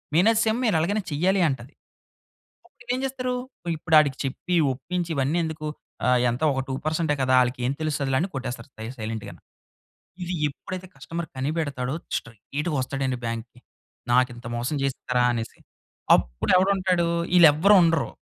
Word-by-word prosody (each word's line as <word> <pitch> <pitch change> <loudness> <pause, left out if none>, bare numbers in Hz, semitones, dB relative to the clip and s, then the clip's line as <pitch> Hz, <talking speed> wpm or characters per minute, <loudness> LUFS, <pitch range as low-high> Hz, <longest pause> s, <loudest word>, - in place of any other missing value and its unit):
Managers 220 +6 +4 0.2
"మీరు 220 -7 +2
ఎలాగైనా 200 +6 0
చేయాలి" 185 +6 +2
అంటది. 130 +1 -5 0.9
అప్పుడు 245 -8 -6
ఏం - - -3
చేస్తారు? 255 -1 -2 0.4
ఇప్పుడు 160 +1 +1
ఆడికి 140 -3 +1
చెప్పి, 160 +7 -2 0.2
ఒప్పించి, 175 +6 -4
ఇవన్నీ 140 +4 +1
ఎందుకు? 160 -1 -4 0.4
ఆహ్, 125 0 +4
ఎంత 120 +4 -3
ఒకా 135 -1 -1
2 - - -1
పర్సంటే 160 0 +1
కదా! 130 0 +2
ఆళ్ళకి 125 0 -1
ఏం - - +1
తెలుస్తదిలే, 140 -4 0
అని 175 - 0
కొట్టేస్తారు 130 +1 -5
సై 110 - -6
సైలెంట్‌గాని. 110 -1 -6 0.8
ఇది 180 +1 -3
ఎప్పుడైతే 185 +6 -7
కస్టమర్ 170 0 -5
కనిపెడతాడో 140 -2 -2 0.2
స్ట్రెయిట్‌గా 140 - -5
వస్తాడండి 130 -1 -2
బ్యాంక్‌కి. 115 +1 -5 0.5
"నాకు 125 +1 +4
ఇంత 120 - -11
మోసం 120 +5 -2
జేస్తారా?" 125 -2 0
అనేసి. 115 -1 -5 0.6
అప్పుడు - - -3
ఎవడుంటాడు? 185 -2 +2 0.3
ఈళ్ళు 170 -2 +9
ఎవ్వరూ 195 +7 +5
ఉండరు. 165 -1 +2
150 Hz, 145 wpm, -25 LUFS, 125-175 Hz, 0.9 s, ఈళ్ళు